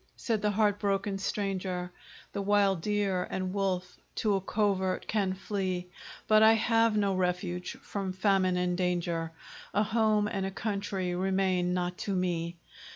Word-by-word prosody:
said 225 -3 -1
the 210 - +2
heart 205 0 +2
broken 195 -1 0
stranger; 190 -3 -2 0.4
The 200 - -2
wild 200 -3 +3
deer 200 -2 0
and 185 0 -3
wolf 185 -2 -2 0.2
to 215 -2 +1
a 195 - +1
covert 195 -2 0
can 195 -3 0
flee, 185 -2 -3 0.4
But 215 0 +6
I 220 0 +8
have 225 0 +3
no 200 -2 +2
refuge 180 -1 -1
from 195 -2 -3
famine 185 -1 +2
and 180 0 +1
danger. 175 -2 -1 0.4
A 210 - +4
home 215 -1 +2
and 195 -2 -2
a 190 - -1
country 195 -3 -2
remain 185 -1 +1
not 180 0 -2
to 200 - -2
me. 170 -2 -1
195 Hz, 155 wpm, -30 LUFS, 180-205 Hz, 0.4 s, I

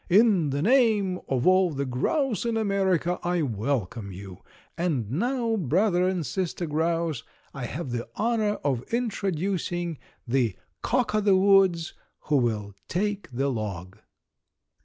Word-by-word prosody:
"In 195 -5 +4
the 140 +2 -1
name 215 -6 +3
of 130 -2 0
all 185 0 +5
the 140 -3 -3
grouse 220 - 0
in 230 -1 0
America 190 -4 +1
I 175 -1 0
welcome 110 -4 -2
you. 95 0 -9 0.4
And 150 - -1
now, 235 - 0
brother 180 - +2
and 185 -4 -1
sister 180 0 -2
grouse, 165 -1 -1 0.3
I 135 -3 -5
have 140 +2 -5
the 120 -1 -4
honor 220 -1 +1
of 135 -5 0
introducing 185 - -2 0.3
the 120 -5 +1 0.3
Cock 245 -3 0
o' 215 - +2
the 200 -2 +4
woods, 190 -4 +4 0.3
who 150 - +1
will 110 -5 -1
take 205 +3 -2
the 135 +3 0
log." 100 -4 -5
175 Hz, 135 wpm, -26 LUFS, 130-200 Hz, 0.4 s, all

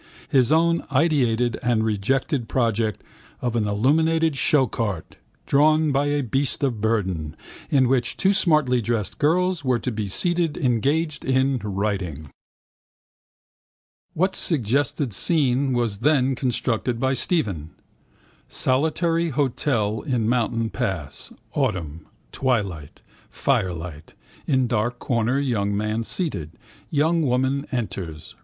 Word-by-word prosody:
His 130 -2 +3
own 165 +1 +3
ideated 130 -6 +2
and 120 -3 +1
rejected 115 +4 -1
project 115 -4 0 0.4
of 120 -1 -2
an 110 -3 +1
illuminated 160 +9 +2
showcart, 115 - 0 0.3
drawn 155 +2 +3
by 140 +1 +1
a 145 0 0
beast 135 +4 -1
of 120 -6 -1
burden, 95 -9 -1 0.3
in 130 -3 +3
which 125 -1 0
two 195 +1 +3
smartly 150 - +2
dressed 110 -3 -2
girls 175 +2 +1
were 130 -2 +2
to 125 - -3
be 105 -2 -3
seated 170 - 0
engaged 145 +5 0
in 130 0 +1
writing. 95 -8 -3 1.8
What 185 +4 +1
suggested 135 - 0
scene 135 - +2
was 120 -5 -1
then 135 0 +3
constructed 125 -2 -1
by 130 +1 +1
Stephen? 110 - -1 0.8
Solitary 165 +5 +1
hotel 120 -6 0
in 125 -7 -1
mountain 115 -2 0
pass. 95 -7 -4 0.2
Autumn. 80 -3 -2 0.2
Twilight. 100 - -2 0.3
Fire 90 - 0
lit. 80 -2 -8 0.3
In 130 -4 +2
dark 120 +1 -1
corner 120 +1 0
young 105 -8 0
man 105 +2 -1
seated. 110 - -2 0.4
Young 160 +3 +2
woman 130 +1 0
enters. 95 - -5
125 Hz, 115 wpm, -23 LUFS, 105-145 Hz, 1.8 s, His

